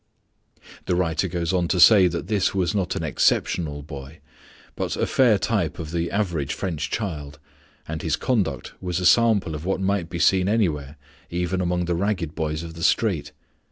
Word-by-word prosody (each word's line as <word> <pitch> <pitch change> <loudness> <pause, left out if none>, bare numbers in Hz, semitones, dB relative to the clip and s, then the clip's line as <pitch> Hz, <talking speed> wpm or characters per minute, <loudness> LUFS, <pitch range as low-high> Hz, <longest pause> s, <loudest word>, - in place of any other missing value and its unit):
The 90 - +1
writer 85 0 0
goes 85 0 -2
on 90 -2 +1
to 90 - 0
say 95 0 +8
that 85 -1 -3
this 100 -2 0
was 90 -3 +1
not 95 -3 -1
an - - -3
exceptional 75 0 0
boy, 70 0 -9 0.6
but - - -3
a - - +1
fair - - +4
type - - -1
of 80 -1 -6
the 85 0 -1
average 85 -9 -1
French 80 -6 -3
child, 80 -8 -4 0.5
and 80 0 -4
his 80 -2 0
conduct 95 - -1
was 90 -1 -2
a 90 - -2
sample 105 -3 +4
of 75 0 -6
what 95 +1 -1
might 95 -3 -1
be 85 - -4
seen 95 +2 +3
anywhere, 80 -10 0 0.3
even 90 +2 -1
among 90 0 0
the 85 - -1
ragged 90 -3 -1
boys 80 0 -3
of 85 -1 -8
the 85 - -10
street. 85 -1 +1
85 Hz, 185 wpm, -23 LUFS, 80-95 Hz, 0.6 s, say